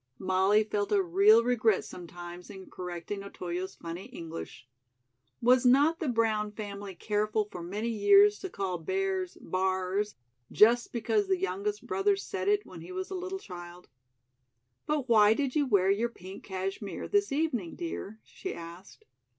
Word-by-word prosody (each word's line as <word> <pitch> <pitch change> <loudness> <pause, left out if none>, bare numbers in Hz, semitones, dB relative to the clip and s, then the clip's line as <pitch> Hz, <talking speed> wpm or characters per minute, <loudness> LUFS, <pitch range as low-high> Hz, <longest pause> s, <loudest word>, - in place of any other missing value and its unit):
Molly 190 +3 +3
felt 205 -1 -2
a 205 - +4
real 200 +6 +5
regret 230 -4 +2
sometimes 175 0 -9
in 190 -2 -11
correcting 180 +2 -5
Otoyo's 185 -1 -5
funny 170 +2 -7
English. 165 -7 -8 0.8
Was 250 +1 +5
not 285 +6 +4
the 315 - -2
Brown 220 -3 +1
family 200 -2 -7
careful 210 +2 0
for 180 - -7
many 205 +7 -3
years 400 - +5
to 380 - -5
call 190 - -3
bears 380 - -2
"b'ars" 190 +2 -1 0.4
just 235 +3 +5
because 390 - 0
the 380 -1 +2
youngest 405 +2 -3
brother 400 +1 +2
said 395 - -4
it 415 0 +2
when - - -11
he - - -10
was 375 +1 -5
a - - -3
little 370 +1 -4
child? 175 - -10 1.0
"But 295 -3 0
why 215 -2 +6
did 275 -1 -1
you 290 -2 +2
wear 195 -4 +4
your 225 +4 +1
pink 190 -4 -11
cashmere 195 +1 -4
this 405 -4 +1
evening, 275 - -1
dear?" 220 - -6
she 380 - -7
asked. 170 +3 -11
210 Hz, 155 wpm, -29 LUFS, 185-295 Hz, 1.0 s, why